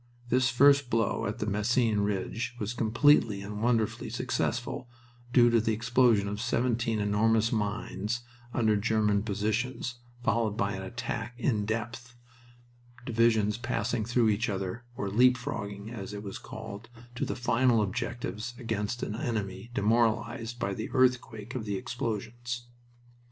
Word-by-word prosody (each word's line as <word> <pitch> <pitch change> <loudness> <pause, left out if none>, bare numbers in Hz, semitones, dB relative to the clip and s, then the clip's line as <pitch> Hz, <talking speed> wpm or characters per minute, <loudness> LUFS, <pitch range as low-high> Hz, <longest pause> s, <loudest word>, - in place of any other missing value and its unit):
This 130 +2 +3
first 140 +1 +5
blow 115 -5 +1
at 105 +3 -3
the 105 - -2
Messines 110 +2 +2
Ridge 105 +4 -2
was 105 +2 -2
completely 115 -3 +3
and 105 +1 -6
wonderfully 115 -2 +1
successful, 120 - -2 0.4
due 120 -2 +6
to 115 -1 +4
the 110 0 +1
explosion 115 -2 +3
of 105 +1 -3
seventeen 120 -2 0
enormous 110 +2 +2
mines 105 +1 -2 0.3
under 115 -3 +2
the 100 - 0
German 105 -2 +2
positions, 110 +4 -2 0.2
followed 110 -3 +1
by 100 0 0
an 95 - -4
attack 115 +2 -4
"in 110 -5 0
depth," 120 +2 -4 0.9
divisions 110 -2 +2
passing 120 -2 -1
through 120 0 +2
each 110 +4 +1
other, 95 +4 -3
or 100 - -3
"leap 125 +5 +5
frogging," 105 -5 -5
as 105 -3 -6
it 105 - -6
was 100 -2 -6
called, 105 +4 -8 0.2
to 125 +4 -3
the - - -2
final 120 0 +3
objectives 120 +2 -3
against 115 -1 -2
an 105 - -2
enemy 105 -2 -3
demoralized 115 +1 +1
by 100 -4 -1
the 110 +3 -4
earthquake 125 -3 +1
of 125 -4 -4
the 100 -2 -2
explosions. 120 +2 -4
115 Hz, 145 wpm, -29 LUFS, 105-120 Hz, 0.9 s, due